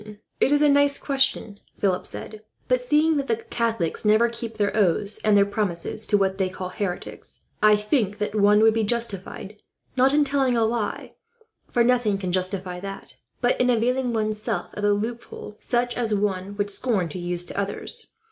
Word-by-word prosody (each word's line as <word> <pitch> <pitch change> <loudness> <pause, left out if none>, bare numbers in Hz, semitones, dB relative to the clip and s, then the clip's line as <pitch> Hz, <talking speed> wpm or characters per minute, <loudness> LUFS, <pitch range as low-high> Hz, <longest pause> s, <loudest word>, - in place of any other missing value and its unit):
"It - - +3
is 290 0 +4
a - - +6
nice 285 0 +4
question," 270 -7 0 0.2
Philip 185 -2 0
said; 215 -1 -8 0.3
"but 255 0 +2
seeing 300 +4 +2
that 275 -1 -2
the 230 - +2
Catholics 225 -6 -2
never 215 +2 +4
keep 230 -1 -6
their 205 -1 0
oaths 200 0 +1
and 210 -1 +4
their 200 - +5
promises 200 0 -1
to 205 - +3
what 190 -1 0
they 190 -1 +1
call 185 0 -6
heretics, 185 -1 -5 0.2
I 215 0 +6
think 210 -1 0
that 210 - -3
one 210 0 +4
would 220 0 +5
be 225 0 0
justified, 210 -2 -3 0.3
not 260 +1 +4
in 295 +1 +4
telling 270 -3 +1
a 225 - +3
lie, 225 -1 -3 0.6
for 240 - +2
nothing 240 -4 +2
can 185 -2 -3
justify 185 0 -1
that, 195 +1 -8 0.3
but 245 0 +2
in 250 - +3
availing 250 +2 +1
one's 215 -1 -1
self - - -3
of 205 - -6
a 205 - +4
loophole 215 0 -4
such 245 0 -1
as 225 -3 0
one 200 -1 -2
would 205 0 -1
scorn 200 -4 0
to 165 - -6
use, 175 0 -2
to - - -9
others. 205 - -3
215 Hz, 190 wpm, -24 LUFS, 200-240 Hz, 0.6 s, a